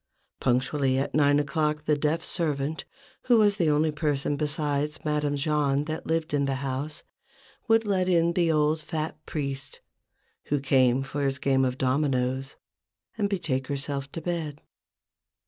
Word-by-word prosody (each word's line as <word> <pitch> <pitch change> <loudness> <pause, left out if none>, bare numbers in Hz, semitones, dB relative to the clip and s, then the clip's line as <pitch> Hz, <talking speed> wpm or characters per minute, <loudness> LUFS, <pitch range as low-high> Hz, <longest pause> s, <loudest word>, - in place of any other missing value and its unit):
Punctually 130 +1 +1
at 135 - -1
nine 145 -1 +4
o'clock 150 +1 0
the 150 - +3
deaf 150 +3 0
servant, 155 -2 -2 0.4
who 245 -2 +5
was 205 -2 +4
the 170 -5 +2
only 150 +1 +2
person 145 -2 0
besides 150 0 -1
Madame 150 -1 0
Jahn 145 -1 +1
that 155 +1 -5
lived 160 -1 -1
in 140 -1 +2
the 135 -1 0
house, 145 +5 -4 0.6
would 225 0 +4
let 185 -3 +1
in 170 -1 +3
the 170 -1 +2 0.3
fat 155 0 -3
old 155 0 -33
priest, 140 -2 -4 0.7
who 145 - 0
came 130 -1 +3
for 140 +2 -4
his 135 0 0
game 135 -1 +2
of 130 0 0
dominoes, 130 -1 0 0.6
and 205 -2 0
betake 160 -9 -1
herself 140 0 -3
to 165 - -5
bed. 160 -4 -3
145 Hz, 150 wpm, -27 LUFS, 135-160 Hz, 0.7 s, who